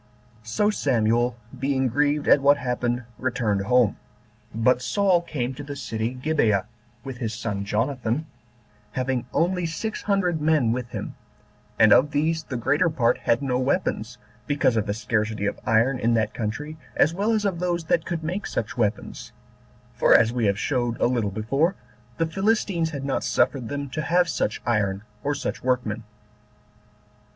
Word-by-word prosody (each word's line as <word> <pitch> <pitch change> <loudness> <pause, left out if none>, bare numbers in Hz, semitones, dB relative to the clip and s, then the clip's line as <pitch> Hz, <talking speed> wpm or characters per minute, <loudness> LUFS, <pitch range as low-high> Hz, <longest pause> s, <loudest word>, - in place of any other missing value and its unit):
So 160 - +1
Samuel, 120 - +1 0.2
being 135 0 +1
grieved 145 +4 +1
at 140 - +6
what 140 +1 +5
happened, 125 -1 -1 0.2
returned 120 -6 0
home; 125 -3 +3 0.5
but 125 +3 +2
Saul 190 +2 +2
came 135 -7 -3
to 140 - -8
the 145 0 -6
city 115 -3 -3
Gibeah, 125 -8 +1 0.4
with 135 -2 -7
his 110 -3 -3
son 105 -3 -3
Jonathan, 120 +5 -1 0.7
having 130 -1 -1
only 180 0 +1
six 215 +7 -4
hundred 180 -6 0
men 150 -7 +3
with 120 0 -3
him; - - -5 0.6
and 110 -1 +7
of 145 +3 +5
these 155 +3 0
the 135 -5 -5
greater 145 +8 +2
part 125 -7 +1
had 115 +4 +1
no 125 -2 0
weapons, 130 -4 -1 0.3
because 135 -4 +2
of 110 -1 0
the 100 - -1
scarcity 110 -1 -1
of 100 - -2
iron 120 +4 +3
in 115 +1 +2
that 110 -1 0
country, 135 +8 -4 0.2
as 155 - +3
well 205 +5 0
as 215 -2 +1
of 185 -4 -1
those 175 -1 -1
that 160 0 +1
could 170 -3 -4
make 180 +6 -3
such 110 - -3
weapons; 110 -3 -2 0.6
for, - - +5
as 115 0 +4
we 115 -5 +2
showed 120 +1 -1
a - - +3
little 120 -4 +1
before, 135 - 0 0.4
the 165 - +1
Philistines 190 -1 0
had 140 -3 -5
not 140 - -1
suffered 125 -5 +1
them 145 0 -3
to 155 - -2
have 175 +3 +2
such 110 -8 -2
iron 105 -3 0 0.2
or 145 +1 0
such 145 - -4
workmen. 125 -4 -1
130 Hz, 165 wpm, -24 LUFS, 115-155 Hz, 0.7 s, and